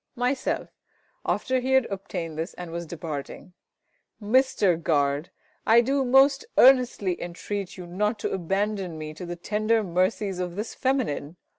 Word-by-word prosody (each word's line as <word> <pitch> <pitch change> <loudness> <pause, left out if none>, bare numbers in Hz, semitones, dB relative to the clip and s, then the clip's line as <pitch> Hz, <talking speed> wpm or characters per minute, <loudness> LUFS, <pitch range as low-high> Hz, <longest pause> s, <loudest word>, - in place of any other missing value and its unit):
Myself 250 +2 -1 0.6
(after 260 -1 +1
he 260 +1 -1
had 265 -2 +5
obtained 185 -4 -5
this 160 +4 -4
and 175 -2 -7
was 170 0 -5
departing). 160 +2 -7 0.7
Mister 215 -4 +3
Guard, 150 -2 0 0.3
I 230 +2 +6
do 270 +3 +1
most 270 +2 +5
earnestly 250 -8 +5
entreat 185 +3 -5
you 180 - -7
not 210 +6 -1
to - - -2
abandon 195 -1 -1
me 155 0 -6
to 175 +3 -8
the 175 - -4
tender 215 +5 0
mercies 185 +1 0
of 180 -1 -3
this 210 +3 -4
feminine. 230 - -1
195 Hz, 145 wpm, -26 LUFS, 170-235 Hz, 0.7 s, I